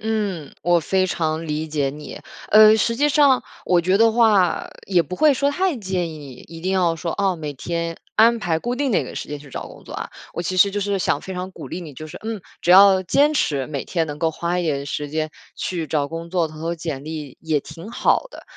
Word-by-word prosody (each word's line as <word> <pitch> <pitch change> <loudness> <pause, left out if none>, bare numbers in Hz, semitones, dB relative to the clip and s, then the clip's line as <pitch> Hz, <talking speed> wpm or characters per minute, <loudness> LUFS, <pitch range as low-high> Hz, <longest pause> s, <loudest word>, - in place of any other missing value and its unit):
嗯， 205 -8 -2
我 175 +1 +3
非 185 +4 +1
常 160 -2 -2
理 155 +1 -3
解 145 -3 0
你。 150 +1 -9 0.3
呃， 215 +1 +8
实 230 +1 +1
际 290 +4 +3
上 280 -3 +4 0.2
我 175 -1 +3
觉 185 +2 0
得 195 - +4
的 225 - +2
话， 210 -7 +3 0.2
也 180 -3 +3
不 170 +3 -7
会 300 +3 +5
说 280 +2 +1
太 360 +1 0
建 185 -6 -2
议， 150 -4 -9 0.2
一 165 0 -10
定 185 +3 -1
要 175 -3 +2
说， 165 0 -3
哦， 195 -3 +1
每 150 -2 -5
天 170 +4 -4 0.2
安 230 +2 +5
排 170 -6 0
固 240 +8 -2
定 280 +1 -1
哪 215 - +2
个 - - -9
时 - - -6
间 150 0 -5
去 145 0 -14
找 - - -6
工 - - -14
作 - - -10
啊。 - - -5 0.2
我 170 - -3
其 185 +2 -3
实 200 +2 +6
就 205 +1 -2
是 200 0 0
想 155 -5 0
非 190 - -7
常 180 +1 -5
鼓 - - -9
励 180 - -5
你， 160 -4 -9
就 155 +4 -8
是 155 - -9
嗯， 220 -1 -4 0.2
只 175 - +1
要 190 0 +8
坚 285 - +3
持 140 - 0
每 140 -3 -4
天 165 -3 -1
能 150 0 -6
够 160 0 +1
花 170 +3 -2
一 180 - 0
点 140 -3 -1
时 145 +1 -3
间 155 0 -2 0.2
去 170 -4 -3
找 145 -1 -1
工 165 +1 -7
作， 175 -3 +1
投 155 0 -12
投 165 +2 -2
简 155 -4 -5
历 155 -4 -7
也 155 -3 0
挺 170 +9 -10
好 370 - +1
的。 - - -11
175 Hz, 265 characters per minute, -22 LUFS, 155-200 Hz, 0.3 s, 呃